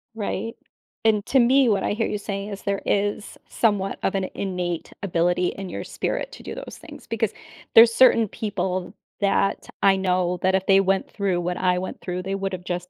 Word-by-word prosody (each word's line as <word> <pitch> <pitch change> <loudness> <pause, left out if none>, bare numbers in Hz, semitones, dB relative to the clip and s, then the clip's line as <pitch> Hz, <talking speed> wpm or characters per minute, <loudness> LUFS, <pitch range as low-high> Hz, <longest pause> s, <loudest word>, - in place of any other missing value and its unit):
Right, 225 +1 -3 0.5
and 215 -2 +2
to 270 - +4
me, 260 +2 +5
what 205 -4 +2
I - - 0
hear 220 +2 0
you 210 - -2
saying 200 0 -5
is, 200 -1 -7
there 200 -1 -2
is 205 +1 -1
somewhat 205 -4 0
of 195 - 0
an 190 -1 -1
innate 180 -3 -3
ability 175 -1 +1
in 195 -1 -5
your - - -5
spirit - - -3
to - - -11
do - - -6
those - - -8
things, - - -12
because, - - -1 0.4
there's 230 0 +9
certain 230 -3 +5
people 185 -4 -3 0.3
that 200 0 +1 0.2
I 195 -1 +5
know 180 -1 0
that 190 +1 +3
if 190 0 0
they 195 0 +6
went 195 0 +1
through 190 -4 -1
what 180 +1 -2
I 180 -1 +2
went 185 - -6
through, 180 0 -4
they 195 +1 -2
would've 195 -2 -4
just 180 0 -4
195 Hz, 200 wpm, -24 LUFS, 180-210 Hz, 0.5 s, there's